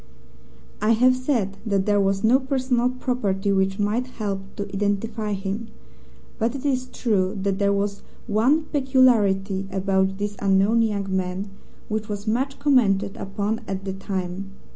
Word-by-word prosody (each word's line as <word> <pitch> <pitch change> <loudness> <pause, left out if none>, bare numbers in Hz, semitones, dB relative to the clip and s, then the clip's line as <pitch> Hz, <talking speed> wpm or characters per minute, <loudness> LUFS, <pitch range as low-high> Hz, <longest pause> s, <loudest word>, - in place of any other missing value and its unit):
I 215 +2 +4
have 255 +3 +4
said 240 -7 -1
that 200 -4 0
there 205 -1 +3
was 195 0 +1
no 240 +4 +5
personal 255 -2 +1
property 215 -6 -1
which 190 0 +1
might 215 +5 0
help 210 -6 -3 0.2
to 205 - -3
identify 205 +2 -1
him, 200 +3 -4 0.7
but 230 +4 0
it 275 - -6
is 255 -2 0
true 205 -5 0
that 195 0 0
there 200 0 +3
was 200 0 -1 0.2
one 245 +9 +3
peculiarity 220 -10 +2
about 190 0 +1
this 205 0 -3
unknown 200 +4 +3
young 200 -4 -1
man 190 +2 -2 0.4
which 215 0 -3
was 205 0 -4
much 265 +5 0
commented 230 -9 +2
upon 200 +3 -3
at 195 0 -4
the 190 - -2
time. 190 0 -4
205 Hz, 150 wpm, -24 LUFS, 195-240 Hz, 0.7 s, no